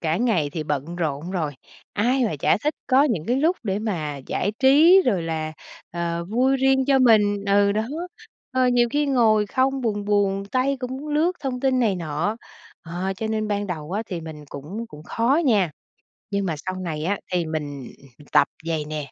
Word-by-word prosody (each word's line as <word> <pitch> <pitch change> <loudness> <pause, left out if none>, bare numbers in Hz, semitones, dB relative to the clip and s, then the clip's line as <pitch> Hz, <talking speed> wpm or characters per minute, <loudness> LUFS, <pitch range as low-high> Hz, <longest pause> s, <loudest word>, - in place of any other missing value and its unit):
cả 160 0 0
ngày 205 -12 +1
thì 160 - -3
bận 150 +3 -3
rộn 160 0 -2
rồi, 160 -6 -2 0.4
ai 245 +5 +2
mà 180 -9 -1
chả - - +3
thích 300 - +1
có 265 +1 +5
những 205 - -1
cái 245 +2 +1
lúc 325 +6 +2
để 200 -2 -1
mà 165 -10 -3
giải 205 +3 -1
trí, 315 +8 +7
rồi 190 -8 +2
là, 160 -1 -3 0.4
ờ, 170 0 -3
vui 260 +5 +2
riêng 265 0 +3
cho 270 -1 +4
mình. 205 -5 +4
Ừ, 200 0 +4
đó. 215 +1 0 0.7
Ờ, 255 -1 +3
nhiều 240 -1 +3
khi 290 +1 +1
ngồi 220 -6 +3
không 265 +4 +1
buồn 205 -4 -1
buồn, 200 -1 +1
tay 265 +2 +1
cũng 250 0 -4
muốn 300 +3 -7
lướt 310 +4 +2
thông 255 -3 -3
tin 265 -1 +2
này 215 -5 +2
nọ. 165 +6 -2 0.5
Ờ, 180 +3 -3
cho 220 - -3
nên 215 -1 -1
ban 205 0 -1
đầu 165 -2 -5
á 215 +3 -1
thì 175 -4 -4
mình 155 -2 -9
cũng 190 +12 -6
cũng 150 -5 -12
khó 245 - +1
nha, 205 - +3 0.6
nhưng 200 -1 0
mà 165 -4 -1
sau 185 - -3
này 165 -5 -4
á 200 +2 0
thì 175 -2 +1
mình 145 -4 -5 0.4
tập - - +5 0.2
vậy 155 -2 -1
nè, 150 -3 -5
205 Hz, 200 wpm, -23 LUFS, 165-250 Hz, 0.7 s, trí